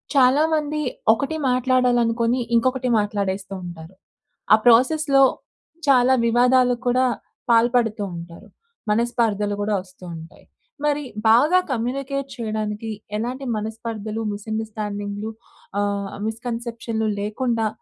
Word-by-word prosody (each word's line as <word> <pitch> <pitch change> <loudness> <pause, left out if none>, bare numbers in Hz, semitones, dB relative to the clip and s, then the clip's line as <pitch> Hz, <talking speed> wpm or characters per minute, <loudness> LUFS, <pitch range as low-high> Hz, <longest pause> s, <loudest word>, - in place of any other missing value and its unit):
చాలా 270 +3 +5
మంది 305 -1 0 0.3
ఒకటి 275 +7 -2
మాట్లాడాలి 250 -1 +2
అనుకుని 230 +2 +1 0.2
ఇంకొకటి 255 +2 +1
మాట్లాడేస్తూంటారు. 190 -4 -4 0.6
ఆ - - +11
ప్రాసెస్‌లో 275 +4 +5 0.6
చాలా 260 -1 +5
వివాదాలు 245 +1 +4
కూడా 250 +1 +3 0.5
పాల్పడుతూంటారు. 220 -8 0 0.4
మనస్పర్ధలు 215 -2 +1
కూడా 205 0 0
వస్తూ 185 0 -18
ఉంటాయి. 160 0 -12 0.4
మరి 295 0 +1 0.3
బాగా 295 +11 +5
కమ్యూనికేట్ 270 +3 -2
చేయడానికి 215 -1 -3 0.3
ఎలాంటి 250 +5 -4
మనస్పర్ధలు, 220 0 -5
మిస్‌అండర్‌స్టాండింగ్‌లు, 210 -1 -4 0.5
ఆహ్, 200 -1 -1 0.2
మిస్‌కన్సెప్షన్‌లు 230 -1 -3
లేకుండా 225 +2 -1
230 Hz, 90 wpm, -22 LUFS, 210-255 Hz, 0.6 s, ఆ